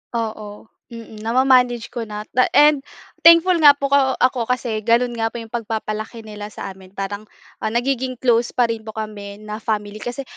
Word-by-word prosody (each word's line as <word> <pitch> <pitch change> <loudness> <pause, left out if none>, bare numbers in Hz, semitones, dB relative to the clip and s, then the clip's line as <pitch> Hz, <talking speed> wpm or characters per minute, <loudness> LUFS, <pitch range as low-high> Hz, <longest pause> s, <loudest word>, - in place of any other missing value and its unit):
Oo, 215 -2 -5 0.2
mm. 230 -2 -11
Na 225 +2 -3
ma-manage 250 -3 +3
ko 230 -2 -5
na 210 0 -6
ta 255 0 +3
and 295 -1 +6 0.5
thankful 335 +2 +7
nga 290 -2 +8
po 280 -1 -3
ko 270 -2 +3
ako 250 -2 +1
kasi 240 -3 -1
ganoon 235 +3 +2
nga 225 - +1
po 225 - -9
yung 225 -2 -7
pagpapalaki 220 -1 -4
nila 210 -1 -8
sa 210 - -7
amin, 190 0 -16
parang, 205 +2 -5 0.3
ah, - - -2
nagiging 255 +3 -1
close 240 -1 +1
pa 240 -2 +2
rin 225 -1 -7
po 220 - -8
kami 210 -2 -6
na 215 0 -6
family. 210 -1 -3
Kasi, 245 +5 -5
230 Hz, 190 wpm, -20 LUFS, 215-250 Hz, 0.5 s, nga